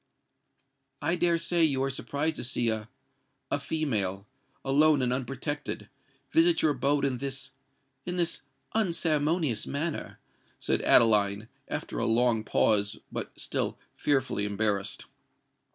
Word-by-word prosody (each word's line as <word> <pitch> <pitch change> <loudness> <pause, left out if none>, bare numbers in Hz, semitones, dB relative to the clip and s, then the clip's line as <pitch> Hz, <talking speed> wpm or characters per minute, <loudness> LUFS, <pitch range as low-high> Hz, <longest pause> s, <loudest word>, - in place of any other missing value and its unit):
"I 170 - 0
dare 170 -1 +2
say 170 0 +2
you 135 -4 +2
are 135 - 0
surprised 145 +4 -2
to - - -5
see 120 -1 +1
a—a 110 +5 -7
female—alone 135 +2 0
and 125 0 +1
unprotected—visit 145 - -1
your 155 - +4
abode 140 +1 +1
in 130 -3 -1
this—in 135 +2 -7
this 170 -1 0 0.3
unceremonious 160 - +1
manner?" 155 +3 -3 0.4
said - - 0
Adeline, 105 -1 +5 0.2
after - - -4
a - - 0
long 115 -1 +2
pause, 100 -2 +1
but - - -6
still - - -2 0.2
fearfully 130 -8 0
embarrassed. 100 -1 -1
135 Hz, 110 wpm, -28 LUFS, 115-155 Hz, 0.4 s, Adeline